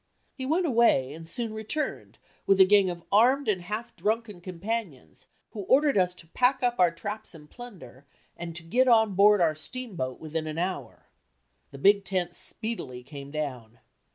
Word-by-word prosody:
He 260 -1 -5
went 340 +5 +1
away 230 - +3
and 160 +1 -10
soon 235 -3 -2
returned 220 +8 -4 0.3
with 195 0 +4
a 190 - +9
gang 200 -1 +4
of 175 -1 -6
armed 255 +7 +4
and 195 -4 +1
half 210 +6 -5
drunken 215 -3 -2
companions 180 - -6 0.2
who 215 - -8
ordered 285 +5 +4
us 180 -2 +2
to 170 - -15
pack 255 +6 +1
up 240 -3 +1
our 180 -1 +6
"traps 205 +4 -7
and 150 -2 -14
plunder" 150 - -12 0.3
and 170 -1 -7
to 175 - -6
get 250 +11 +2
on 220 -4 +4
board 205 +1 +5
our 160 -2 +3
steamboat 155 - -5
within 155 0 -4
an 155 0 -5
hour. 170 -9 -4 0.6
The 140 - -11
big 200 +7 +4
tent 180 -2 -2
speedily 150 - -5
came 140 +1 -10
down. 130 -7 -5
190 Hz, 175 wpm, -27 LUFS, 160-230 Hz, 0.6 s, a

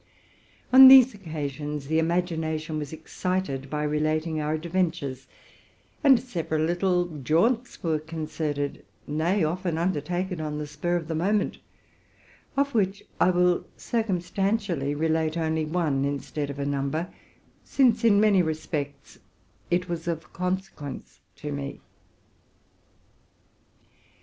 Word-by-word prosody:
On 265 0 +11
these 260 -2 +9
oc 200 -4 -14
'asions 150 -1 -4
the 160 +3 +1
imagination 160 -2 -1
was 145 -2 -5
excited 160 -3 -3
by 150 +1 -2
relating 155 +1 0
our 150 +1 0
adven 175 +2 +1
tures; 135 -5 -7 0.8
and 270 -4 +7
several 165 -10 -2
little 175 -1 0
jaunts 220 - +1
were 160 -3 +1
concerted, 155 -2 -4 0.2
nay, 165 +6 0
often 170 +1 -1
undertaken 175 +1 -1
on 150 -1 -3
the 150 - -3
spur 150 +4 -2
of 165 -3 -2
the 165 - -2
moment, 200 +6 0 1.0
of 280 0 +1
which 200 -3 0 0.2
I - - +5
will 180 0 +2
cir 235 - -1
cumstantially 185 -5 -1
relate 160 0 +1
only 160 -1 0
one 155 -4 0
instead 145 +1 -3
of 140 - -6
a 140 - -2
number, 140 +4 -2 0.5
since 250 -5 +2
in 210 -3 +5
many 205 -3 +5
respects 155 -3 -4 0.5
it 180 +1 +1
was 170 -1 -4
of 165 -2 -4
consequence 180 -6 -4 0.2
to 150 - -6
me. 140 -1 -5
160 Hz, 125 wpm, -26 LUFS, 150-185 Hz, 1.0 s, On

